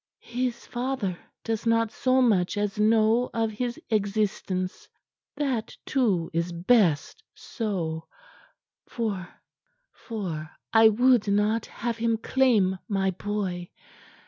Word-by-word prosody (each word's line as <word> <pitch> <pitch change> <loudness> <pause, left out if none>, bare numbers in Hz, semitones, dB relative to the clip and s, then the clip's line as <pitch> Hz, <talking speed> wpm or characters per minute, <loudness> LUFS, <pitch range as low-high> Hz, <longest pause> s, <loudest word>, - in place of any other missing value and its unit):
His 245 0 -3
father 240 -6 -2 0.3
does 225 0 -2
not 230 -1 +2
so 255 +2 +2
much 200 -6 +2
as 205 0 -1
know 220 +3 +3
of 225 -1 +1
his 240 +2 -3
existence. 200 -3 -1 0.5
That, 265 -7 -2
too, 200 -11 +1
is 170 +1 -1
best 180 - +2
so, 170 -8 -4 0.8
for 200 -7 -3 1.4
I 225 0 +8
would 245 0 +3
not 210 +2 +1
have 235 -1 -4
him 230 0 +1
claim 220 -7 +2
my 195 -2 +1
boy. 185 -2 -3
215 Hz, 105 wpm, -26 LUFS, 190-235 Hz, 1.4 s, I